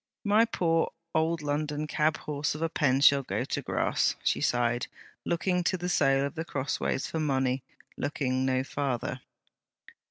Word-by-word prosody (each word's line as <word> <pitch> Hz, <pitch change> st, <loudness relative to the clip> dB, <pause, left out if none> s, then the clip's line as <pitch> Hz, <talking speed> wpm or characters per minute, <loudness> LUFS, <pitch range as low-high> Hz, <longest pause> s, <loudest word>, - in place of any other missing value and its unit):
'My 215 Hz, +2 st, +4 dB
poor 165 Hz, -7 st, +1 dB, 0.2 s
old 160 Hz, 0 st, +1 dB
London 150 Hz, +1 st, -1 dB
cabhorse 150 Hz, -1 st, -1 dB
of 155 Hz, -, -4 dB
a 165 Hz, -, +1 dB
pen 135 Hz, -4 st, +2 dB
shall 140 Hz, -1 st, +6 dB
go 130 Hz, -, -2 dB
to -, -, -2 dB
grass!' -, -, +1 dB
she -, -, +1 dB
sighed, 120 Hz, 0 st, +1 dB, 0.4 s
looking 180 Hz, +1 st, 0 dB
to 185 Hz, -, +1 dB
the 180 Hz, +1 st, -3 dB
sale 135 Hz, -5 st, +3 dB
of 140 Hz, -, -4 dB
The 160 Hz, -, -3 dB
Crossways 135 Hz, -3 st, -2 dB
for 160 Hz, -, -3 dB
money; 135 Hz, -3 st, +1 dB, 0.4 s
looking 130 Hz, -3 st, -1 dB
no 130 Hz, 0 st, +1 dB
farther. 135 Hz, -3 st, -3 dB
145 Hz, 155 wpm, -29 LUFS, 135-165 Hz, 0.4 s, shall